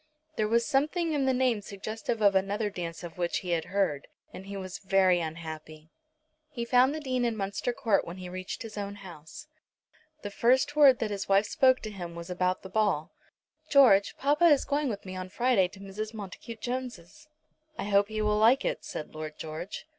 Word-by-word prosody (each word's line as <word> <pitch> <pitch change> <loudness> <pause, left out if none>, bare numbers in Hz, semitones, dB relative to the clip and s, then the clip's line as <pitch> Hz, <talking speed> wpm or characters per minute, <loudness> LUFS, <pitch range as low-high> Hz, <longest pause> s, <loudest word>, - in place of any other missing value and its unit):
There 215 - 0
was 230 +2 +2
something 310 +4 +1
in 280 -2 +1
the 265 - +3
name 250 -4 +1
suggestive 215 +3 -4
of 200 -1 +6
another 200 +2 0
dance 170 -2 -6
of 175 +1 -9
which 175 -1 -1
he 180 - -2
had 165 -2 0
heard, 185 -7 -1 0.3
and 190 - -9
he 200 0 -6
was 185 -1 -6
very 190 -2 +3
unhappy. 160 -1 -7 0.6
He 240 -6 -4
found 255 +4 +4
the - - -3
Dean 255 -4 -1
in 235 -2 0
Munster 200 +4 -2
Court 235 -5 +1
when 170 +2 -8
he 185 -1 -7
reached 185 +5 -6
his 215 -2 -7
own 200 0 -5
house. 165 - -11 0.8
The 205 - -5
first 260 +7 +2
word 280 -4 +7
that 220 -2 -2
his 200 -1 -4
wife 195 +2 +4
spoke 260 +3 +3
to 215 - -6
him 175 -4 -7
was 170 +1 -7
about 180 0 0
the - - -7
ball. 185 -6 0 0.6
"George, 230 -9 +5
papa 295 +5 +2
is 295 -5 +5
going 285 -1 0
with 205 -4 -5
me 185 0 -7
on 185 0 -6
Friday 235 -2 +2
to 190 - -15
Mrs. 210 +3 -6
Montacute 215 +2 -8
Jones'." 250 - -6 0.5
"I - - -3
hope 200 0 +3
he 215 0 -2
will 210 0 +2
like 240 +5 +4
it," - - -2
said 155 - -7
Lord 155 0 -7
George. 160 +4 -6
205 Hz, 200 wpm, -28 LUFS, 185-245 Hz, 0.8 s, word